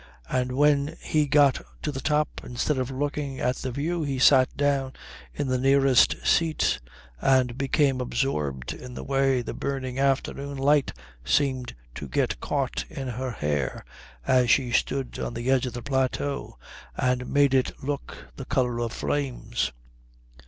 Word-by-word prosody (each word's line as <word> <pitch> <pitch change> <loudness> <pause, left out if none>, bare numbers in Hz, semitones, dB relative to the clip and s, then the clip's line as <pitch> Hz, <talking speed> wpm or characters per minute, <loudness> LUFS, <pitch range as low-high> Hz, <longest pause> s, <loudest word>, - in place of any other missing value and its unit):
And 125 0 0
when 145 +1 +2
he 150 -1 +1
got 140 -1 +4 0.2
to 150 - -1
the 135 -1 -5
top, 150 +1 0
instead 130 +3 -1
of 130 0 -2
looking 140 0 -3
at 125 +1 0
the 130 - -4
view 155 +7 -2
he 140 -3 -2
sat 130 0 +5
down 140 -2 +1 0.4
in 145 - -3
the 130 -1 0
nearest 135 -1 +4
seat 160 - +2 0.4
and 130 -3 +3
became 135 0 +1
absorbed 75 - -2
in 125 -1 -10
the - - -6
way 135 -2 +1
the - - -5
burning 135 -2 -3
afternoon 140 +1 0
light 140 +1 +3 0.3
seemed 130 - 0 0.2
to - - -7
get - - 0
caught - - -1
in 135 -2 -5
her 130 +2 -3
hair 75 - -2 0.4
as 125 -2 +3
she 125 -2 +3
stood 130 +2 -1
on - - -4
the 120 +3 -1
edge 130 -1 +2
of 125 - -6
the 120 - -6
plateau, 135 +1 -1 0.4
and 125 0 0
made 140 -1 +3
it 130 -1 +2
look 140 +1 -4 0.2
the 135 - -6
colour 125 -3 0
of 120 -1 -2
flames. 125 -5 -2
135 Hz, 160 wpm, -26 LUFS, 125-140 Hz, 0.4 s, sat